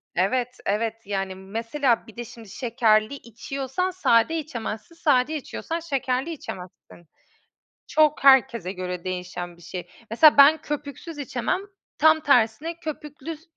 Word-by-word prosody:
evet, 245 +7 0
evet, 220 +2 0
yani, 195 -2 -3
mesela 230 +6 -1
bir 225 - -15
de 240 - -5
şimdi 230 -3 -13
şekerli 225 0 +1
içiyorsan 275 - -4
sade 325 -3 +3
içemezsin, 235 0 -6
sade 295 -2 +2
içiyorsan 325 +3 -4
şekerli 275 -1 -2
içemezsin. 180 - -10 0.8
Çok 305 -2 +2
herkese 255 -8 +5
göre 180 -1 -5
değişen 180 -1 -5
bir - - -19
şey. 180 0 -7 0.2
Mesela 295 +6 +6
ben 300 +2 +7
köpüksüz 295 +2 -6
içemem, 280 +6 -2 0.4
tam 315 0 +5
tersine 285 +5 +2
köpüklü, 300 -1 -7
s 320 - -24
250 Hz, 130 wpm, -24 LUFS, 215-300 Hz, 0.8 s, ben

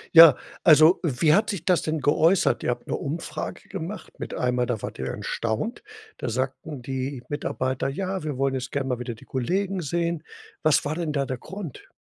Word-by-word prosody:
Ja. 165 -4 +11 0.3
Also, 155 +2 +7
wie 150 0 +3
hat 210 +4 +3
sich 195 -7 -3
das 180 -3 +3
denn 155 0 -1
geäußert? 160 +6 +3
Ihr - - 0
habt 125 - -3
'ne - - -1
Umfrage 155 +1 -5
gemacht, 195 +2 -7
mit - - -5
einmal, 125 0 +1
da 115 -4 -2
wart - - -6
ihr - - -2
erstaunt, 115 - -2 0.4
da - - -2
sagten 130 +3 -3
die 130 0 -4
Mitarbeiter: 130 -2 -1
„Ja, 190 +5 -3
wir 150 -4 -3
wollen 135 0 +1
jetzt 130 -1 -4
gern 140 -2 -1
mal 125 -2 -1
wieder 120 -1 -4
die - - -16
Kollegen 185 +9 -1
sehen.“ 170 +1 -1 0.4
Was 155 -2 +3
war 145 - 0
denn 160 -2 -2
da 140 -2 +1
der 130 -1 -4
Grund? 190 -8 -8
145 Hz, 195 wpm, -25 LUFS, 130-170 Hz, 0.4 s, Ja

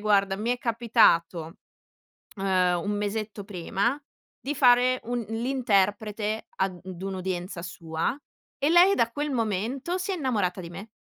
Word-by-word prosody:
guarda, 200 -2 +2
mi 220 +4 -2
è 245 - 0
capitato, 205 -8 +2 0.8
uhm, 185 -2 +2
un 205 - -1
mesetto 210 0 -3
prima 200 - -1 0.4
di 290 +2 -3
fare 250 -1 +4
un 240 -1 -2
l'interprete, 220 -3 0
ad 190 -2 -1 0.2
un'udienza 185 -2 -4
sua, 165 +4 -3 0.4
e 285 +3 +2
lei 360 +3 +7
da 230 -7 +2
quel 295 +2 -2
momento 235 - -1
si 370 +2 -2
è - - 0
innamorata 205 - -1
di 170 - -7
me, 200 +5 -9
215 Hz, 135 wpm, -26 LUFS, 190-245 Hz, 0.8 s, lei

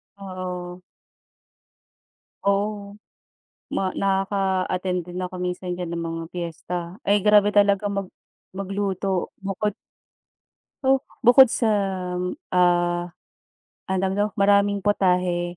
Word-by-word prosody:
Oo. 185 -2 -6 1.6
Oh. 200 0 0 0.8
Ma 190 - 0
nakaka-attend 190 -2 0
din 175 - -7
ako 180 0 -5
minsan 180 0 -3
diyan 175 -1 -5
ng 170 - -3
mga 165 0 -4
piyesta. 170 0 -5 0.3
Ay, 200 0 +1
grabe 210 -1 +6
talaga 205 0 +3
mag 200 -1 -2 0.5
magluto. 195 -1 -2
Bukod 195 +1 -2 1.1
oh, 270 0 +4 0.2
bukod 250 +3 +8
sa, 230 0 0 0.8
ah, 175 -1 +2 0.8
ano 190 -1 0
tawag 190 - +1
dito? 205 - +3
Maraming 200 -1 +3
putahe 180 -3 +2
190 Hz, 100 wpm, -24 LUFS, 180-200 Hz, 1.6 s, bukod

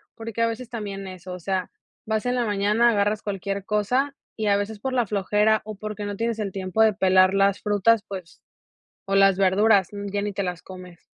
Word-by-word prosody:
porque 230 0 -5
a 230 - +4
veces 230 +1 -5
también 200 -4 -5
eso, 185 -1 -8
o 180 - -7
sea, 190 0 -2 0.4
vas 220 +1 -1
en 245 0 0
la 245 -2 0
mañana, 210 +3 +2
agarras 205 0 +1
cualquier 200 -1 -4
cosa, 250 +7 0 0.2
y 215 - -2
a 200 - +4
veces 205 +1 -3
por 260 +3 -3
la 245 -2 +2
flojera, 210 +2 +1
o 215 - -6
porque 210 +1 -6
no 205 0 -4
tienes 230 +1 -2
el 200 -3 -3
tiempo 190 +2 -1
de 220 -1 +5
pelar 185 -1 +4
las 195 0 +2
frutas, 210 +1 +2
pues, 185 -4 -9 0.7
o 195 - 0
las 195 -1 +5
verduras, 195 0 +3
n 205 0 -6
ya 205 - -1
ni 205 0 -2
te 200 0 -2
las 180 -2 -4
comes. 180 -2 -12
205 Hz, 215 wpm, -24 LUFS, 195-220 Hz, 0.7 s, de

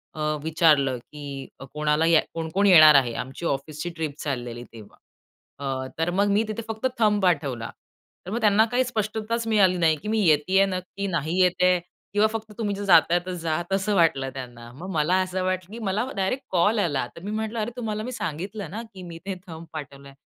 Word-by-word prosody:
अ, - - -8 0.2
विचारलं, 155 -5 +3
की 140 +1 -8 0.3
कोणाला 150 +1 +1
या 165 -1 +5
कोण-कोण 165 +5 0
येणार 155 -5 +9
आहे? 125 -4 +4
आमची 135 +6 -9
ऑफिसची 150 +3 -3
ट्रिप 160 -3 -3
चाललेली 120 -4 -4
तेव्हा. 110 -3 -13 0.6
अ, 135 -2 -3
तर 165 +2 +1
मग 200 +3 +2
मी 205 +2 +3
तिथे 215 +1 -4
फक्त 225 +3 -1
थंब 210 -2 +3
पाठवला. 145 -10 0 0.6
तर 185 - -6
मग 230 - -1
त्यांना 215 0 +5
काही 250 +1 +3
स्पष्टताच 225 0 -2
मिळाली 195 -5 +4
नाही, 165 -2 +3
की 200 - -10
मी 220 0 +1
येतीये 175 +6 +4
नक्की? 190 +1 -4
नाही 170 -1 -1
येतेय? 180 0 +3 0.3
किंवा 205 +1 +4
फक्त 220 -1 -5
"तुम्ही 205 -3 -1
जर 200 - -5
जाताय 175 -1 +5
तर 185 - -4
जा." 165 -3 -2 0.2
असं 195 +2 +1
वाटलं 155 -7 +2
त्यांना. 120 -2 -9
मग 175 +9 -8
मला 160 +3 +2
असं 185 0 -3
वाटलं, 185 0 -2
की 230 - -7
मला 205 +5 0
डायरेक्ट 255 +8 -1
कॉल 205 +5 +3
आला. 145 -10 0
तर - - -11
मी 205 - -4
म्हटलं, 220 +1 -3
"अरे 220 +2 -2
तुम्हाला 215 -3 -3
मी 250 - -5
सांगितलं 195 -1 -5
ना, 215 +4 -5
की 190 -1 -10
मी 170 -2 -8
ते 195 -1 -3
थंब 165 -1 -9
पाठवलंय." 140 -2 -9
180 Hz, 195 wpm, -25 LUFS, 150-205 Hz, 0.6 s, येणार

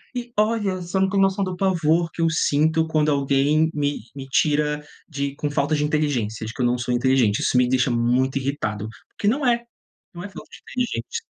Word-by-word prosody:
e 240 -1 -5
olha, 210 -2 +1
você 180 +2 -2
não 190 - +3
tem 195 0 +1
noção 195 +1 +2
do 185 -1 -3
pavor 170 -3 +1
que 165 - -5
eu 165 - +3
sinto 160 0 +2
quando 155 -1 +1
alguém 140 +3 +2
me 145 -1 -1 0.2
me 135 -1 -7
tira 150 +1 +1 0.2
de 140 -3 -3
com 145 0 -2
falta 145 +1 +1
de 150 - 0
inteligência, 125 -8 -1
de 110 - -5
que 130 - -5
eu - - +3
não 120 +1 +2
sou 125 0 -1
inteligente, 120 -4 +2
isso - - 0
me 125 0 +4
deixa 130 0 +2
muito 125 +3 +1
irritado, 110 -6 -3 0.2
porque 205 - -4
não 270 +5 +1
é, 235 -1 +2 0.5
não 175 +1 -8
é - - -5
falta - - -11
de - - -12
inteligência. 235 - -3
150 Hz, 210 wpm, -23 LUFS, 130-180 Hz, 0.5 s, me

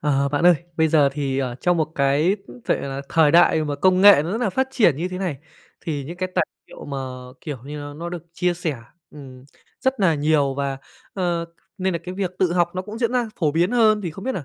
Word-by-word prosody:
Ờ, 140 -1 +1
bạn 145 +3 -1
ơi, 180 - +8 0.2
bây 160 -1 +3
giờ 150 -3 +4
thì, 135 -2 -2
ờ, 125 -3 -2
trong 175 +7 +1
một 155 -1 -1
cái, 145 +8 +2
ứ, 120 0 -13
vệ - - +1
là 135 0 -5
thời 160 -2 +4
đại 165 -1 +5
mà 145 -1 -2
công 185 +4 +3
nghệ 200 -6 +8
nó 165 +4 -4
rất 225 - -1
là 230 -5 +1
phát 265 +6 0
triển 210 - +3
như 170 +5 -2
thế 185 0 -6
này, 180 -8 -3 0.4
thì 145 -4 -4
những 170 +6 -8
cái 185 +1 -2
tài - - +2 0.2
liệu - - -12
mà, 140 - -5 0.4
kiểu 145 -5 -6
như, 150 +2 -7
nó 145 0 -7
nó 170 +3 -6
được 175 -2 -7
chia 180 0 0
sẻ, 165 -5 -3 0.3
ừm, 130 -3 -12 0.4
rất 265 -3 0
nà 175 -5 +4
nhiều 145 -2 +1
và, 140 -1 -2 0.4
ờ, 175 -3 -1 0.3
nên 190 0 0
là 170 - -1
cái 180 +1 -6
việc 190 -2 -2
tự 180 -2 +2
học 175 -1 +2
nó 185 - -2
cũng 210 +3 -8
diễn 235 -1 0
ra 245 -2 0
phổ 150 -5 +1
biến 170 +4 +2
hơn, 220 -3 +4
thì 170 - -3
không 195 +5 -10
biết 265 - -1
nà 175 - -5
165 Hz, 260 wpm, -22 LUFS, 145-185 Hz, 0.4 s, ơi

